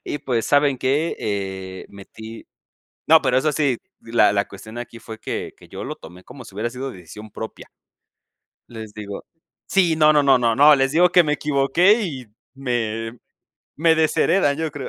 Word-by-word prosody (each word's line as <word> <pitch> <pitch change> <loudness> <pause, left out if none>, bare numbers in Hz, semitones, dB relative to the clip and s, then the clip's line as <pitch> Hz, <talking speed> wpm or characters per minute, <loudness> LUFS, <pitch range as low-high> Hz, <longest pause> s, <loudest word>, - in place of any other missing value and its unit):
y 145 - -4
pues, 125 -5 -2
¿saben 145 -2 +2
qué? 145 +6 0
Eh, 95 -2 -5
metí" 110 +3 -11 0.6
no, - - +6
pero 125 - +2
eso 150 +3 0
sí, 140 -5 0 0.2
la 115 -3 +2
la 100 0 +1
cuestión 110 +3 -11
aquí 120 -1 -8
fue 110 0 -10
que - - -5
que - - -18
yo - - -8
lo - - -6
tomé 90 +3 -14
como 125 0 -12
si 100 - -14
hubiera 110 +4 -2
sido 130 +2 -6
decisión 105 +3 -12
propia. 110 +2 -9 1.0
Les 110 -3 -10
digo 100 -2 -8 0.4
sí, 175 -4 +2
no, 155 -1 +5
no, 150 - +3
no, 135 -2 +5
no. 115 -2 +1
No, 145 +4 +7
les 135 0 +1
digo 175 +3 +5
que 180 - +6
me 150 -2 -1
equivoqué 150 - +2
y 135 - -5 0.3
me 115 -3 -3 0.6
me 160 +2 +3
desheredan, 160 -1 +2
yo 160 -1 -3
creo. 140 -2 -7
130 Hz, 180 wpm, -21 LUFS, 110-150 Hz, 1.0 s, No